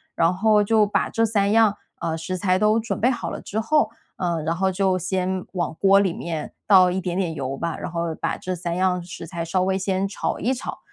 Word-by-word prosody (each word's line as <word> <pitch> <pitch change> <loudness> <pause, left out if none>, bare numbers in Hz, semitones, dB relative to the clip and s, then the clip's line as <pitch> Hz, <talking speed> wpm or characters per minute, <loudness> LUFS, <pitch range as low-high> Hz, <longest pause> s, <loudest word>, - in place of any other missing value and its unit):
然 165 +1 +3
后 210 +2 +3
就 215 +1 +4
把 205 - 0
这 225 - +1
3 205 -2 +1
样， 220 -2 +4 0.3
呃， 160 - -1
食 185 +3 -4
材 185 -1 +1
都 215 +1 +3
准 230 +2 -3
备 245 - +4
好 250 - -2
了 - - -6
之 215 - -3
后， 300 +7 +2 0.3
呃， 170 -3 -1
然 165 +2 -1
后 190 +2 +1
就 190 0 +1
先 185 +1 -1
往 175 -3 -2
锅 195 0 +6
里 190 -4 +1
面 160 -3 -5
倒 185 -3 +6
一 190 +1 -1
点 180 -1 -3
点 180 -4 -1
油 135 -2 -4
吧， 170 +1 -3
然 - - -5
后 170 -1 -2
把 - - -1
这 185 0 -4
3 170 0 -3
样 180 0 +1
食 170 -1 -8
材 170 0 -5
稍 180 +3 0
微 190 0 +1
先 190 0 -1
炒 200 - -3
一 250 +5 +1
炒。 255 - -6
185 Hz, 240 characters per minute, -23 LUFS, 170-205 Hz, 0.3 s, 锅